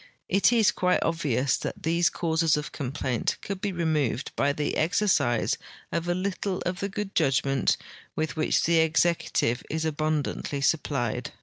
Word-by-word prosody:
It 195 Hz, +5 st, +4 dB
is 225 Hz, -4 st, +4 dB
quite 180 Hz, 0 st, +1 dB
obvious 140 Hz, -6 st, +1 dB
that -, -, -6 dB
these 170 Hz, +2 st, +3 dB
causes 160 Hz, -2 st, +1 dB
of 150 Hz, -, -4 dB
complaint 130 Hz, -3 st, -2 dB
could 195 Hz, -2 st, -5 dB
be 205 Hz, -1 st, -1 dB
removed 155 Hz, -8 st, -1 dB
by 140 Hz, -, +2 dB
the 145 Hz, +1 st, -2 dB
exercise 165 Hz, -, +1 dB, 0.3 s
of 170 Hz, +1 st, -2 dB
a 175 Hz, -, +1 dB
little 190 Hz, 0 st, -2 dB
of 180 Hz, 0 st, -2 dB
the 200 Hz, -, -2 dB
good 205 Hz, 0 st, -4 dB
judgment 135 Hz, -3 st, +2 dB, 0.4 s
with 155 Hz, -3 st, -2 dB
which 155 Hz, -, +1 dB
the 165 Hz, 0 st, +3 dB
executive 160 Hz, -6 st, +1 dB
is 160 Hz, +1 st, -2 dB
abundantly 155 Hz, -2 st, -1 dB
supplied. 140 Hz, -6 st, 0 dB
160 Hz, 150 wpm, -27 LUFS, 140-180 Hz, 0.4 s, It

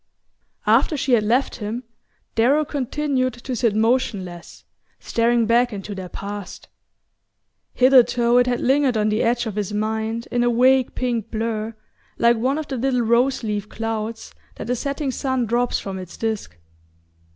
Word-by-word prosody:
After 305 Hz, -, +3 dB
she 270 Hz, -, -1 dB
had 230 Hz, -, +5 dB
left 240 Hz, +6 st, +1 dB
him, 225 Hz, +2 st, -4 dB, 0.5 s
Darrow 275 Hz, +7 st, +3 dB
continued 275 Hz, -1 st, -1 dB
to 245 Hz, +1 st, -5 dB
sit 225 Hz, -2 st, +1 dB
motionless, 215 Hz, -6 st, -1 dB, 0.3 s
staring 235 Hz, 0 st, +1 dB
back 240 Hz, +2 st, +3 dB
into 205 Hz, 0 st, -6 dB
their 190 Hz, -2 st, -7 dB
past. 200 Hz, +1 st, -7 dB, 1.1 s
Hitherto 245 Hz, -2 st, +5 dB
it 245 Hz, -, +3 dB
had 245 Hz, -1 st, 0 dB
lingered 265 Hz, -2 st, +2 dB
on 215 Hz, 0 st, +2 dB
the 215 Hz, +1 st, +1 dB
edge 240 Hz, +1 st, +1 dB
of 220 Hz, -3 st, -4 dB
his 210 Hz, -1 st, -2 dB
mind 220 Hz, +2 st, -2 dB
in 245 Hz, -1 st, +1 dB
a 240 Hz, -, +3 dB
vague 255 Hz, +2 st, +3 dB
pink 235 Hz, -3 st, -2 dB
blur, 225 Hz, 0 st, -3 dB, 0.4 s
like 235 Hz, 0 st, +4 dB
one 260 Hz, +5 st, 0 dB
of 310 Hz, -1 st, -4 dB
the 265 Hz, -, -4 dB
little 250 Hz, 0 st, +1 dB
rose 240 Hz, +3 st, +2 dB
leaf 210 Hz, -1 st, -3 dB
clouds 225 Hz, 0 st, -4 dB, 0.2 s
that 235 Hz, -, -5 dB
a -, -, +2 dB
setting 280 Hz, +2 st, -2 dB
sun 260 Hz, -2 st, -1 dB
drops 240 Hz, +2 st, 0 dB
from 190 Hz, -1 st, -5 dB
its 185 Hz, -2 st, -9 dB
disk. 220 Hz, -, -3 dB
235 Hz, 160 wpm, -22 LUFS, 215-255 Hz, 1.1 s, had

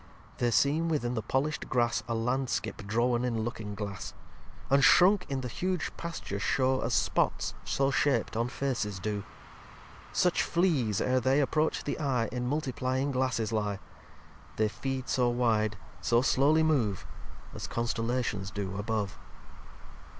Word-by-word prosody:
lviii -, -, -24 dB
They 120 Hz, -, +2 dB
seem 150 Hz, +7 st, +2 dB
within 125 Hz, -6 st, 0 dB
the 115 Hz, -, -1 dB
polisht 135 Hz, +7 st, -1 dB
Grass 120 Hz, -2 st, +1 dB
A 115 Hz, -, -1 dB
landskip 125 Hz, +3 st, -1 dB
drawen 120 Hz, +3 st, +1 dB
in 115 Hz, -3 st, -1 dB
Looking 110 Hz, -3 st, -5 dB
Glass. 100 Hz, -1 st, -6 dB, 0.5 s
And 140 Hz, 0 st, +4 dB
shrunk 180 Hz, +4 st, +6 dB
in 135 Hz, -1 st, -2 dB
the 125 Hz, -, -4 dB
huge 180 Hz, +6 st, -2 dB
Pasture 165 Hz, -, -5 dB
show 130 Hz, +4 st, +1 dB
As 115 Hz, -1 st, 0 dB
spots, -, -, +1 dB
so 135 Hz, 0 st, +1 dB
shap'd, 135 Hz, -6 st, +1 dB
on 115 Hz, +2 st, +1 dB
Faces 125 Hz, -6 st, -2 dB
do. 100 Hz, +1 st, -3 dB, 0.9 s
Such 180 Hz, -1 st, +2 dB
Fleas, 150 Hz, -, +1 dB
ere 130 Hz, 0 st, +2 dB
they 130 Hz, +3 st, +2 dB
approach 155 Hz, +2 st, +1 dB
the 145 Hz, -, -3 dB
Eye, 130 Hz, -7 st, 0 dB
In 125 Hz, 0 st, -2 dB
Multiplyiug 130 Hz, -1 st, -1 dB
Glasses 125 Hz, -4 st, 0 dB
lye. 105 Hz, -2 st, -1 dB, 0.8 s
They 110 Hz, -1 st, +2 dB
feed 135 Hz, +2 st, -4 dB
so 125 Hz, -2 st, +2 dB
wide, 110 Hz, -3 st, +1 dB, 0.2 s
so 120 Hz, +8 st, +3 dB
slowly 145 Hz, +5 st, +4 dB
move, 120 Hz, -, +1 dB, 0.5 s
As -, -, -6 dB
Constellations 115 Hz, -3 st, -1 dB
do 100 Hz, -1 st, -4 dB
above. 105 Hz, -1 st, -2 dB
125 Hz, 145 wpm, -29 LUFS, 110-140 Hz, 0.9 s, shrunk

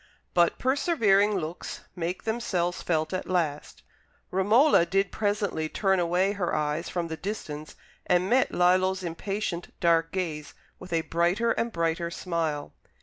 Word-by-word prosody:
But 175 Hz, -1 st, +3 dB
persevering 215 Hz, -, +3 dB
looks 165 Hz, 0 st, -5 dB
make 175 Hz, +1 st, -3 dB
themselves 190 Hz, -6 st, -1 dB
felt 155 Hz, -1 st, -1 dB
at 185 Hz, -, -3 dB
last. 165 Hz, -5 st, -2 dB, 0.5 s
Romola 210 Hz, -, +5 dB
did 195 Hz, +3 st, 0 dB
presently 205 Hz, -7 st, -1 dB
turn 190 Hz, +1 st, +1 dB
away 180 Hz, +3 st, +2 dB
her 200 Hz, -4 st, -1 dB
eyes 150 Hz, +2 st, -1 dB
from 175 Hz, -2 st, -2 dB
the 160 Hz, -, -4 dB
distance 155 Hz, -7 st, -6 dB, 0.3 s
and 180 Hz, +1 st, +3 dB
met 255 Hz, +4 st, +3 dB
Lillo's 185 Hz, +1 st, +2 dB
impatient 175 Hz, +1 st, -3 dB
dark 165 Hz, -1 st, +3 dB
gaze 155 Hz, -6 st, -4 dB, 0.2 s
with 185 Hz, 0 st, -11 dB
a 165 Hz, -1 st, +2 dB
brighter 175 Hz, +8 st, +1 dB
and 230 Hz, +1 st, -1 dB
brighter 170 Hz, -1 st, -1 dB
smile. 165 Hz, -4 st, -3 dB
180 Hz, 140 wpm, -27 LUFS, 165-200 Hz, 0.5 s, Romola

